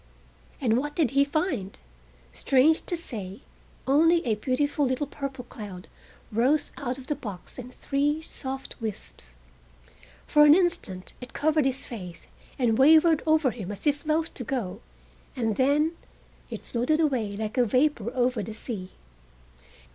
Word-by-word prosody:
And 240 -4 +2
what 295 +2 -4
did 305 -8 +2
he 275 +1 +4
find? 280 - -2 0.6
Strange 280 +4 +3
to 350 - -1
say 205 - -6 0.4
only 325 +5 +4
a 230 - +2
beautiful 270 +7 0
little 260 +2 0
purple 275 -2 -6
cloud 200 -6 -9 0.4
rose 260 +7 +2
out 255 -2 -3
of 265 - -10
the 295 - -1
box 205 -4 -8
in 250 0 -7
three 285 +4 0
soft 265 -5 -7
wisps. 60 - -6 0.9
For 295 - +5
an 300 +1 +8
instant 335 - -1
it 250 - -9
covered 305 -1 +2
his 270 0 -1
face 180 -8 -8 0.3
and 235 -3 +2
wavered 315 +3 +6
over 310 -4 +4
him 205 -5 -6
as 205 +6 -7
if 290 -1 +1
loath 315 +1 0
to 250 - -6
go, 230 -7 -3 0.5
and 225 -4 0
then 290 +5 +3 0.6
it - - -7
floated 255 +6 0
away 240 -10 0
like 215 +3 -4
vapor 250 -1 +2
over 250 -2 +1
the 215 +1 -6
sea. 205 -5 -6
260 Hz, 145 wpm, -27 LUFS, 220-295 Hz, 0.9 s, an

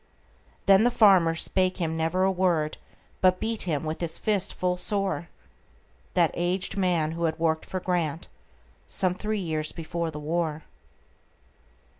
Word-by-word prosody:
Then 195 +1 +6
the 245 - +4
farmer 190 -8 +5
spake 185 +2 +1
him 165 -3 -2
never 165 +3 0
a 190 - +3
word, 175 -5 0 0.4
But 185 0 +4
beat 220 -3 -3
with 155 0 -2
his 165 -1 -2
fist 205 -3 +1
full 180 0 0
soreThat 70 - -3
aged 180 +2 -1
man, 175 -5 +1
who 170 +1 -2
had 160 -1 -1
worked 160 -1 0
for 185 - -3
GrantSome 160 - -3
three 215 +3 -2
years 155 -4 -2
before 170 0 -4
the 155 - -8
war. 160 0 -2
170 Hz, 135 wpm, -26 LUFS, 160-185 Hz, 0.4 s, Then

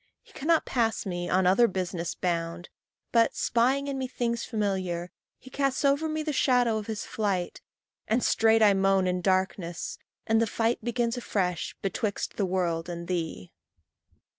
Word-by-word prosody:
He - - -21
cannot 320 +3 +1
pass 225 -3 0
me, 175 -2 -3
on 185 0 +2
other 195 +7 +5
business 180 -3 -3
bound, 170 -1 -2 0.4
But, 230 -1 +3
spying 260 +4 +1
in 275 -1 -3
me 260 - -2
things 235 -2 -2
familiar, 190 -5 -2 0.3
he 260 - -15
Casts 275 0 0
over 285 +3 +2
me 310 0 -2
the 305 -1 -2
shadow 245 -5 +3
of 210 - -8
his 220 -2 -4
flight, 195 -5 -2 0.5
And 235 +3 +1
straight 225 0 +4
I 205 -1 +6
moan 195 -1 +3
in 180 0 0
darkness 185 -2 -1 0.3
and 225 0 +3
the 230 - +2
fight 230 +2 0
Begins 240 0 -1
afresh 180 -7 -2
betwixt 200 +1 -2
the 200 - +1
world 175 -2 -1
and 170 0 -6
thee. 165 - -4
205 Hz, 165 wpm, -27 LUFS, 180-240 Hz, 0.5 s, I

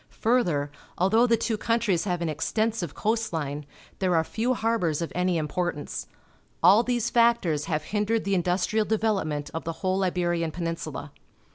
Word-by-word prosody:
Further, 175 - +2 0.3
although 220 +7 +4
the 230 -1 +3
two 225 0 -1
countries 225 -7 +1
have 175 -3 -1
an - - -1
ex 155 0 -3
tensive 220 -8 -1
coast 225 +1 0
line, 145 -3 -3 0.3
there 185 -2 +2
are 160 - +3
few 235 +9 -1
harbours 220 -10 0
of 165 - -3
any 180 -1 +1
importance. 155 0 -3 0.6
All 195 +6 +7
these 240 -1 -1
factors 230 -11 +3
have 155 -2 -1
hindered 210 +5 0
the 200 - -1
industrial 185 +4 +1
development 195 -10 -1
of 165 - -4
the 165 - -3
whole 190 +1 +1
Iberian 175 -2 0
Peninsula. 165 -3 -5
180 Hz, 160 wpm, -26 LUFS, 165-225 Hz, 0.6 s, All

